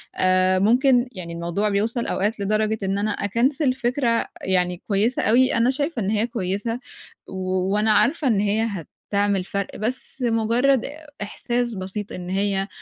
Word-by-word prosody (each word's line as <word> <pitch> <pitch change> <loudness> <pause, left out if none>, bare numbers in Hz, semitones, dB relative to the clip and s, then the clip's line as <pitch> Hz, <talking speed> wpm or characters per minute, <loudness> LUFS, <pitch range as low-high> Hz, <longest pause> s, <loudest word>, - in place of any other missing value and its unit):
آآ 185 0 +3
ممكن 245 +4 +4
يعني 175 -5 -7
الموضوع 170 +5 -1
بيوصل 220 +4 0
أوقات 210 +3 -1
لدرجة 215 +2 0
إن 195 +1 0
أنا 210 +1 0
أكنسل 255 +8 +1
فكرة 245 -2 0
يعني 180 -1 0
كويسة 215 +4 +1
أوي، 250 +4 +4
أنا 235 +1 +3
شايفة 285 0 -1
إن 195 - -1
هي 215 +2 +1
كويسة، 225 +1 -2 0.5
و - - -10 0.4
وأنا 215 +1 +2
عارفة 290 +5 +2
إن 220 -5 +3
هي 210 +2 +1 0.4
هتعمل 200 -2 +1
فرْق، 200 +1 -4
بس 250 +4 -2
مُجرّد 235 +3 +2 0.4
إحساس 240 +3 -2
بسيط 190 +2 -5
إن 180 0 -6
هي 195 0 0
215 Hz, 150 wpm, -23 LUFS, 195-240 Hz, 0.5 s, ممكن